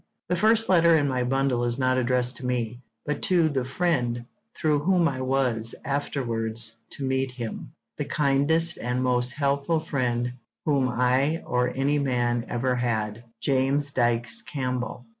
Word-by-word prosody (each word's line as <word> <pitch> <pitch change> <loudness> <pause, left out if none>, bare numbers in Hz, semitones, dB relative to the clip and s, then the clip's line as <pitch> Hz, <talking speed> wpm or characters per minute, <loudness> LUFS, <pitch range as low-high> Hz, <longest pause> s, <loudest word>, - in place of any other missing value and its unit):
The 180 - +2
first 220 +4 +4
letter 170 -3 +5
in 145 -2 +1
my 130 -2 0
bundle 130 -1 +1
is 120 0 0
not 130 -1 +2
addressed 125 0 +1
to 130 - -8
me, 120 -1 -2 0.2
but 150 -1 -2
to 170 -4 +3
the 135 -4 -1
friend 125 -5 -1 0.3
through 150 -2 +1
whom 175 +2 +3
I 130 -4 -3
was 130 -4 0
afterwards 115 -5 -1 0.2
to 140 - -6
meet 130 0 0
him, 120 -3 -7 0.2
the - - -2
kindest 155 +4 +1
and 125 +1 -1
most 125 0 +1
helpful 140 +3 0
friend 125 -6 -1 0.3
whom 140 -4 +2
I 130 +6 +1
or 125 0 0
any 140 +2 +1
man 120 -3 0
ever 125 +2 0
had, 115 -2 -2 0.2
James 140 +1 +1
Dykes 120 -3 +2
Campbell. 125 -3 -4
130 Hz, 155 wpm, -25 LUFS, 120-145 Hz, 0.3 s, letter